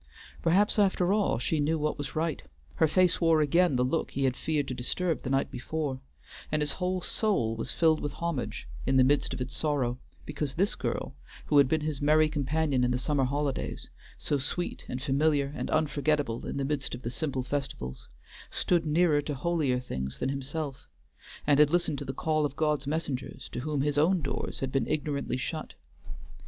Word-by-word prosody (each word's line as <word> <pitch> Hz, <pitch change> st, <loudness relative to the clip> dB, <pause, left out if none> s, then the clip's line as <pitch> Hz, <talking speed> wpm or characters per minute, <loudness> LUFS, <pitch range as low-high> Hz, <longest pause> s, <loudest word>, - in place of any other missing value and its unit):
Perhaps, 195 Hz, +6 st, +3 dB
after 190 Hz, -2 st, +3 dB
all, 210 Hz, -1 st, +2 dB
she 150 Hz, +6 st, 0 dB
knew 155 Hz, +3 st, +1 dB
what 150 Hz, -1 st, -1 dB
was 145 Hz, -1 st, -5 dB
right; 160 Hz, -1 st, -1 dB, 0.4 s
her 160 Hz, -, +5 dB
face 180 Hz, +3 st, +3 dB
wore 165 Hz, -2 st, +5 dB
again 155 Hz, +1 st, +3 dB
the 125 Hz, 0 st, +2 dB
look 160 Hz, +6 st, 0 dB
he 135 Hz, -, -2 dB
had 130 Hz, -2 st, +2 dB
feared 150 Hz, -1 st, -1 dB
to 130 Hz, -, -3 dB
disturb 160 Hz, +8 st, -1 dB
the 130 Hz, -, -4 dB
night 135 Hz, 0 st, +1 dB
before, 135 Hz, +1 st, -3 dB, 0.5 s
and 155 Hz, -1 st, +2 dB
his 150 Hz, -, +2 dB
whole 185 Hz, 0 st, -1 dB
soul 175 Hz, -, 0 dB
was 115 Hz, -, -3 dB
filled 160 Hz, -2 st, +3 dB
with 145 Hz, -1 st, -3 dB
homage 170 Hz, -7 st, -3 dB, 0.2 s
in 135 Hz, 0 st, +3 dB
the 130 Hz, -, +7 dB
midst 145 Hz, +3 st, +2 dB
of -, -, -4 dB
its 125 Hz, 0 st, -4 dB
sorrow, 130 Hz, -5 st, 0 dB, 0.3 s
because 145 Hz, -2 st, -3 dB
this 195 Hz, +5 st, +2 dB
girl, -, -, -3 dB, 0.3 s
who 145 Hz, -, +5 dB
had 140 Hz, -, +6 dB
been 155 Hz, +3 st, +1 dB
his 150 Hz, -2 st, -3 dB
merry 155 Hz, +1 st, +4 dB
companion 145 Hz, -2 st, 0 dB
in 125 Hz, -, +2 dB
the 125 Hz, -, +1 dB
summer 135 Hz, +1 st, +1 dB
holidays, 140 Hz, +1 st, -2 dB, 0.3 s
so 145 Hz, -, 0 dB
sweet 160 Hz, +7 st, -2 dB
and 125 Hz, +1 st, -4 dB
familiar 140 Hz, 0 st, +2 dB
and -, -, -3 dB
unforgetable 150 Hz, -5 st, 0 dB
in -, -, -3 dB
the 140 Hz, -, -1 dB
midst 140 Hz, -3 st, -2 dB
of 125 Hz, -, -11 dB
the 120 Hz, -, -3 dB
simple 135 Hz, -1 st, -2 dB
festivals, 125 Hz, -, -4 dB, 0.4 s
stood 170 Hz, -3 st, +1 dB
nearer 155 Hz, -1 st, +3 dB
to 145 Hz, 0 st, -4 dB
holier 145 Hz, -3 st, +1 dB
things 65 Hz, -, -4 dB
than 130 Hz, -, -1 dB
himself, 140 Hz, +1 st, -4 dB, 0.6 s
and 145 Hz, -1 st, +4 dB
had 150 Hz, -1 st, +7 dB
listened 170 Hz, -4 st, +1 dB
to -, -, -5 dB
the -, -, -3 dB
call 155 Hz, +3 st, 0 dB
of 145 Hz, -1 st, -1 dB
God's 150 Hz, -3 st, 0 dB
messengers 145 Hz, -4 st, -3 dB
to -, -, -5 dB
whom 145 Hz, +1 st, -1 dB
his 145 Hz, 0 st, +1 dB
own 170 Hz, +2 st, +3 dB
doors 140 Hz, -, -3 dB
had 135 Hz, -1 st, -2 dB
been 135 Hz, -4 st, 0 dB
ignorantly 145 Hz, -3 st, -1 dB
shut. 155 Hz, -, -5 dB
145 Hz, 195 wpm, -29 LUFS, 135-160 Hz, 0.6 s, the